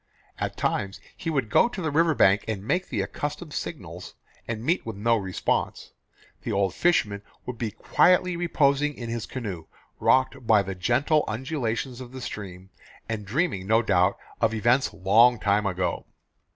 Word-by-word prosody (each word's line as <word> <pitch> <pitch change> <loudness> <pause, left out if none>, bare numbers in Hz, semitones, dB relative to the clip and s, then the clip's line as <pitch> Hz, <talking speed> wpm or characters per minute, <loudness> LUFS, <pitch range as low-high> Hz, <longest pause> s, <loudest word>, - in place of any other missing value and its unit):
At - - -3
times 100 0 -1 0.2
he 165 - -4
would 135 -9 -1
go 235 - +5
to 240 - -7
the 160 -4 -1
river 160 +1 +3
bank 100 -2 +4
and 105 -3 -3
make 180 +9 0
the 110 -6 -1
accustomed 145 - -5
signals, - - -6 0.3
and 115 -1 -4
meet 170 +8 +1
with 115 -2 -6
no 115 +4 +2
response. 95 -4 -2 0.5
The - - -4
old 100 -2 +1
fisherman 105 - +1 0.2
would 125 -2 -6
be 115 - -1
quietly 180 - +3
reposing 150 -4 +1
in 120 -2 -6
his 115 -2 -4
canoe, 100 -10 -6 0.3
rocked 130 -1 +2
by 105 -3 +5
the 95 0 -4
gentle 120 - +2
undulations 125 0 -3
of 125 0 -10
the 130 - -7
stream, 95 -5 -7 0.4
and 105 -2 -4
dreaming, 115 - -1
no 110 +2 +4
doubt, 90 -4 +2 0.2
of 115 0 +1
events 120 +4 +2
"long 115 +6 +4
time 100 0 +1
ago." 90 -2 -2
115 Hz, 165 wpm, -26 LUFS, 100-140 Hz, 0.5 s, go